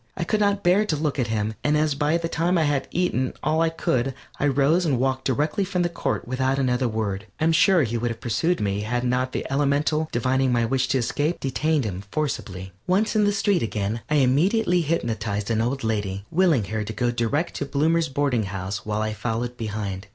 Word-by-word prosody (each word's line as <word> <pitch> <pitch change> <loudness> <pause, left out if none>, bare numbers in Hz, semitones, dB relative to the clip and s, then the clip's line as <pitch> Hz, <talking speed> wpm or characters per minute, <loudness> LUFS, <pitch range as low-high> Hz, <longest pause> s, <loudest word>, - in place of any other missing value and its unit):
I 180 - -1
could 210 +5 0
not 200 -1 +1
bear 180 +4 +4
to 185 -7 -1
look 150 -1 -1
at 125 - +1
him, 110 -1 -1
and 150 +1 +2
as 150 -1 +2
by 150 +3 +1
that 165 0 -4
time 175 +3 +1
I 165 - +3
had 145 -2 0
eaten 130 -8 0
all 160 +1 +2
I 165 - +3
could, 135 -5 -1 0.2
I 145 - +2
rose 145 +6 +3
and 145 -7 +1
walked 130 0 0
directly 150 - 0
from 185 -2 -1
the 175 - +1
court 170 - -3
without 130 +2 0
another 130 -1 +1
word. 110 -2 -3
I - - -1
am 165 - +4
sure 175 +1 +5
he 115 -1 -2
would 120 +1 -1
have 115 -1 -5
pursued 165 +9 0
me 100 -1 -1
had 120 +3 -1
not 125 +1 0
the - - -3
elemental, 145 +3 +1
divining 130 +2 +1
my 120 -1 +2
wish 130 +2 0
to - - +1
escape, 145 +7 -1
detained 150 +1 0
him 95 -3 -4
forcibly. 95 -11 -3
Once 200 +5 +2
in 210 -1 +4
the 205 - +3
street 200 -2 +1
again, 110 0 -2
I 150 - +2
immediately 175 - +3
hypnotized 115 -9 -2
an 110 -1 +1
old 125 +3 -1
lady, 100 -3 -2
willing 165 - +3
her 110 +2 -3
to 110 +1 -5
go 120 +3 0
direct 120 +7 -1
to - - -2
Bloomer's 160 +4 +1
Boarding 135 -5 0
House 95 +1 -4
while 105 0 -1
I 110 0 -2
followed 115 +3 -3
behind. 105 -4 -4
135 Hz, 220 wpm, -24 LUFS, 115-160 Hz, 0.2 s, sure